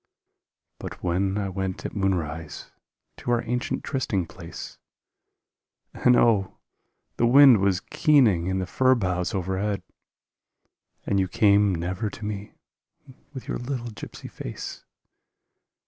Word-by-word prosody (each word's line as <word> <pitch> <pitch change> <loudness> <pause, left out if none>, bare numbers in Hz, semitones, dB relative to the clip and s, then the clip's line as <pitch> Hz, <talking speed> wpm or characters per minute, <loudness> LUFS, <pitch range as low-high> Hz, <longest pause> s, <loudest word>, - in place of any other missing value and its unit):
But - - -8
when 95 +3 0
I 100 -2 -1
went 95 0 -4
at - - -5
moonrise 80 -5 -2 0.5
to - - -6
our 120 -1 +2
ancient 125 +2 -2
trysting 120 - -1
place 85 0 -10 1.1
And, 125 - +4
oh, 110 -5 +3 0.6
the 120 - +3
wind 135 -2 +8
was 95 -2 +1
keening 115 - +3
in 95 0 0
the 95 - -1
fir 130 +7 +3
boughs 90 -2 -1
overhead!.... 95 +1 -2 1.2
And 100 - +1
you 95 - +1
came 100 -1 +3
never 90 +6 -2
to 105 - -9
me 105 -1 -6 0.8
with 130 -3 -9
your - - -3
little 120 -2 -4
gypsy 105 - -9
face. - - -7
100 Hz, 125 wpm, -25 LUFS, 90-120 Hz, 1.2 s, wind